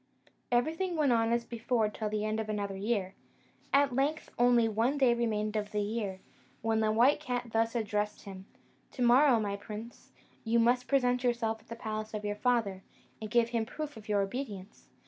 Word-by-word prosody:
Everything 325 +9 +1
went 295 -4 +2
on 230 -1 +2
as 235 0 +1
before 235 -1 0
till 210 0 -4
the 210 0 -2
end 215 +1 -1
of 220 -1 -4
another 200 -2 -2
year. 195 -2 -1 0.6
At 275 -1 +4
length 285 +4 -1
only 240 -1 +5
one 230 +6 +1
day 260 -4 +4
remained 215 -2 -1
of 210 -1 -2
the 210 -1 0
year, 205 -3 -3 0.4
when 225 0 +1
the 215 -1 +2
white 245 +7 +4
cat 245 -5 -4
thus 225 +1 +1
addressed 210 -2 -2
him: 190 -1 -10 0.5
"To 250 - -2
morrow, 245 +1 +6
my 205 -2 -2
prince, 215 +3 -9 0.3
you 230 +1 +1
must 245 +2 +3
present 250 -2 +2
yourself 235 -2 0
at 220 - -27
the 230 - -7
palace 215 -1 -5
of 210 0 -4
your 205 0 -1
father, 215 -5 0 0.4
and 215 - -5
give 235 0 +3
him 235 -1 0
a - - -2
proof 300 +2 -6
of 215 -1 -12
your 205 -1 +2
obedience. 205 -3 -7
225 Hz, 195 wpm, -31 LUFS, 210-245 Hz, 0.6 s, morrow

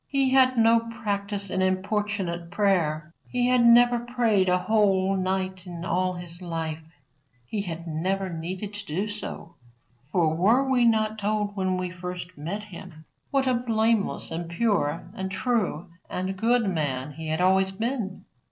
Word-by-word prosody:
He 270 -2 +2
had 260 -1 +5
no 230 0 +5
practice 205 -3 -3
in 185 - 0
importunate 185 -2 -1
prayer. 165 -5 0 0.2
He 245 0 +1
had 250 -1 +4
never 240 +1 +6
prayed 235 -6 +1
a 180 - +4
whole 195 -1 +2
night 190 0 -2 0.2
all 185 +1 0
his 175 0 -8
life. 165 -2 -4 0.6
He 205 - -3
had 170 -3 -5
never 185 +4 -1
needed 180 +4 -5
to 205 0 -6
do 185 +8 -1
so. 205 -5 -7 0.5
For 160 -4 +2
were 225 +11 +3
we 250 -2 +3
not 220 -1 +2
told 205 0 -1
when 185 -2 0
we 180 -1 -3
first 180 0 -7
met 175 +8 -5
him 165 -5 -11 0.2
what 275 -1 +1
a 255 - +2
blameless 225 -5 +1
and 165 +1 -4
pure 170 -5 0
and 190 0 -4
true 195 -5 -1 0.2
and 185 +1 -3
good 230 +2 +2
man 145 -6 -1
he 160 +2 -7
had 160 +1 -1
always 190 +1 +4
been? 220 0 -3
190 Hz, 155 wpm, -26 LUFS, 175-220 Hz, 0.6 s, never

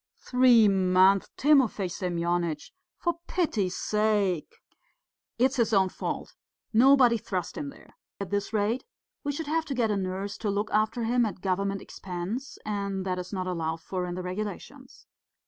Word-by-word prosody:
"Three 250 -3 +5
months! 190 0 +4
Timofey 265 -9 +3
Semyonitch, 175 -2 -2 0.3
for 345 -1 -1
pity's 215 - 0
sake!" 210 -6 0 0.8
"It's 260 +3 +2
his 230 -2 +2
own 190 -2 +4
fault. - - -5 0.4
Nobody 245 0 +6
thrust 185 -4 -4
him 295 -2 -4
there. - - -16 0.2
At 200 -1 -5
this 205 +1 -1
rate 220 +3 0 0.4
we 290 - -1
should 310 +3 -4
have 320 +2 0
to 275 - -3
get 230 -3 +1
a 205 - +1
nurse 190 +2 -3
to 215 - -1
look 205 +1 -1
after 215 +2 +1
him 240 +2 +2
at 205 -5 -3
government 195 +1 -1
expense, 195 +9 -6
and 200 -2 -2
that 185 -1 -1
is 180 - -7
not 185 -2 -2
allowed 165 -3 -2
for 180 +1 -3
in 175 - -4
the 185 - -4
regulations. 200 +3 -7
205 Hz, 160 wpm, -27 LUFS, 185-235 Hz, 0.8 s, Nobody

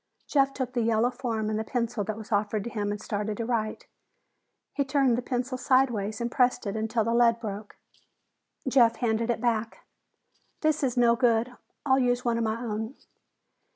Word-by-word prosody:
Jeff 275 -2 +2
took 260 -2 -4
the 245 - 0
yellow 230 +2 +2
form 235 -4 -3
and 215 0 -1
the - - -1
pencil 235 -2 -2
that 215 +1 -4
were 220 - -8
offered 210 0 0
to 235 - -6
him 205 -2 -2
and 205 - -4
started 210 0 -3
to 230 - -2
write. 225 -3 -2 0.9
He 280 - +1
turned 270 -3 +2
the 245 - -1
pencil 255 +1 -3
sideways 240 -6 +1
and 235 0 -2
pressed 250 -3 +2
until 220 +2 -1
the 230 +2 0
lead 235 -1 +4
broke. 210 -2 -6 0.9
Jeff 240 -3 +5
handed 230 -1 0
it 235 - 0
back. 230 -1 -1 0.8
"This 310 -1 +1
is 260 -3 -1
no 235 -1 +5
good. 240 0 +1 0.3
I'll 265 -1 +4
use 245 -1 +1
one 235 -1 +1
of - - 0
my 220 +1 -1
own." 220 +1 -4
235 Hz, 185 wpm, -27 LUFS, 220-250 Hz, 0.9 s, Jeff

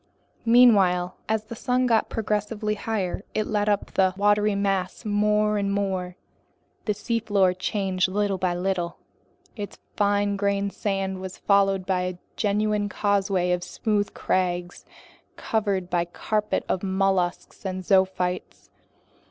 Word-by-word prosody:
Meanwhile, 195 -7 +5
as 220 -1 +1
the 225 +2 -8
sun 250 +2 +1
got 230 -3 +2
progressively 210 0 -1
higher, 205 -3 -3
it 215 - +1
lit 210 -1 0
up 205 -1 0
the 185 -1 +2
watery 205 0 +3
mass 195 +1 -1
more 210 0 +2
and 200 0 0
more. 190 -3 -2 0.7
The 210 - 0
seafloor 205 -4 +1
changed 185 0 0
little 200 0 0
by 180 -1 0
little. 175 -1 -2 0.6
Its 205 -3 -6 0.2
fine 205 -1 +1
grained 200 0 0
sand 195 -2 -2
was 190 -1 -7
followed 195 -2 +2
by 185 -1 +1
a 180 -1 -3 0.2
genuine 210 0 0
causeway 195 -3 +1
of 180 0 0
smooth 205 -2 -1
crags 180 -1 -1 0.5
covered 200 -5 -1
by 175 -1 +1
a - - -2
carpet 210 +4 -1
of 185 - -1
mollusks 190 -2 -1
and 185 -1 -4
zoophytes. 190 -1 0
200 Hz, 135 wpm, -25 LUFS, 185-210 Hz, 0.7 s, Meanwhile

